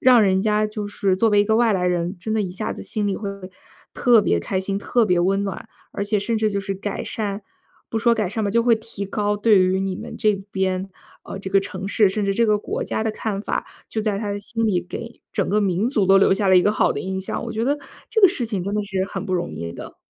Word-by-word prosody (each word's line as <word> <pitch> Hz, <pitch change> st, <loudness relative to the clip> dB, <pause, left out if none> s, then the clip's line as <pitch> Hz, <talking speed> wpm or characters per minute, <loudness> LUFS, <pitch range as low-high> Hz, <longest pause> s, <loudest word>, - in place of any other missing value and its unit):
让 250 Hz, -2 st, +6 dB
人 190 Hz, -1 st, +3 dB
家 215 Hz, 0 st, +2 dB
就 210 Hz, -1 st, -5 dB
是 195 Hz, -2 st, 0 dB
作 225 Hz, +3 st, +3 dB
为 205 Hz, -1 st, +4 dB
一 -, -, -2 dB
个 220 Hz, +1 st, +2 dB
外 230 Hz, -2 st, +4 dB
来 180 Hz, -1 st, 0 dB
人， 175 Hz, +1 st, -1 dB
真 220 Hz, +5 st, -4 dB
的 220 Hz, -, +1 dB
一 185 Hz, -, -4 dB
下 190 Hz, +4 st, -3 dB
子 -, -, -8 dB
心 210 Hz, -1 st, -2 dB
里 195 Hz, -, 0 dB
会 200 Hz, -, -4 dB, 0.6 s
特 235 Hz, -4 st, +4 dB
别 85 Hz, -, +1 dB
开 190 Hz, -, -2 dB
心、 195 Hz, +1 st, -1 dB
特 235 Hz, +3 st, +2 dB
别 180 Hz, -3 st, +2 dB
温 195 Hz, +3 st, +1 dB
暖。 195 Hz, +3 st, -5 dB, 0.2 s
而 200 Hz, -, -3 dB
且 205 Hz, 0 st, +1 dB
甚 225 Hz, +3 st, -1 dB
至 215 Hz, -1 st, +1 dB
就 200 Hz, -, -1 dB
是 195 Hz, 0 st, -3 dB
改 200 Hz, +1 st, -4 dB
善 205 Hz, -2 st, -3 dB, 0.5 s
不 225 Hz, -, -3 dB
说 235 Hz, +1 st, +3 dB
改 215 Hz, -4 st, -1 dB
善 220 Hz, +2 st, -3 dB
吧， 200 Hz, -, 0 dB
就 235 Hz, +3 st, +3 dB
会 235 Hz, -1 st, +5 dB
提 220 Hz, -2 st, -6 dB
高 205 Hz, +1 st, -1 dB
对 215 Hz, 0 st, +4 dB
于 185 Hz, +1 st, +2 dB
你 195 Hz, -1 st, -2 dB
们 -, -, -8 dB
这 215 Hz, -3 st, +2 dB, 0.2 s
边， 190 Hz, 0 st, -1 dB, 0.4 s
呃， 195 Hz, -, -7 dB
这 195 Hz, -, -6 dB
个 195 Hz, 0 st, +4 dB
城 195 Hz, 0 st, -6 dB
市， 200 Hz, 0 st, +3 dB
甚 205 Hz, +1 st, -1 dB
至 195 Hz, 0 st, 0 dB
这 235 Hz, -, +3 dB
个 210 Hz, -1 st, +3 dB
国 -, -, -4 dB
家 220 Hz, -, -2 dB
的 220 Hz, -, +1 dB
看 210 Hz, -2 st, -3 dB
法， -, -, -2 dB, 0.2 s
就 220 Hz, -, -2 dB
在 205 Hz, -2 st, 0 dB
他 205 Hz, -2 st, -3 dB
的 205 Hz, -, -3 dB
心 225 Hz, +2 st, -2 dB
里 185 Hz, -4 st, +2 dB
给 230 Hz, +6 st, -8 dB
整 195 Hz, -, 0 dB
个 210 Hz, +1 st, +2 dB
民 195 Hz, +3 st, +1 dB
族 215 Hz, -7 st, +1 dB
都 195 Hz, 0 st, +6 dB
留 195 Hz, -, +4 dB
下 200 Hz, -1 st, 0 dB
了 185 Hz, -, +6 dB
一 180 Hz, -, +6 dB
个 210 Hz, -, +3 dB
好 -, -, +2 dB
的 -, -, -4 dB
印 190 Hz, +2 st, -3 dB
象。 190 Hz, -, -4 dB
我 230 Hz, -, -5 dB
觉 225 Hz, +1 st, -2 dB
得 290 Hz, +2 st, +1 dB, 0.3 s
这 445 Hz, -, +2 dB
个 390 Hz, -, +10 dB
事 275 Hz, -10 st, -2 dB
情 200 Hz, -5 st, -2 dB
真 200 Hz, +1 st, -2 dB
的 210 Hz, -, 0 dB
是 195 Hz, -2 st, -2 dB
很 -, -, -5 dB
不 185 Hz, -, -3 dB
容 175 Hz, -1 st, -2 dB
易 85 Hz, 0 st, -5 dB
的。 -, -, -10 dB
205 Hz, 300 characters per minute, -22 LUFS, 190-220 Hz, 0.6 s, 个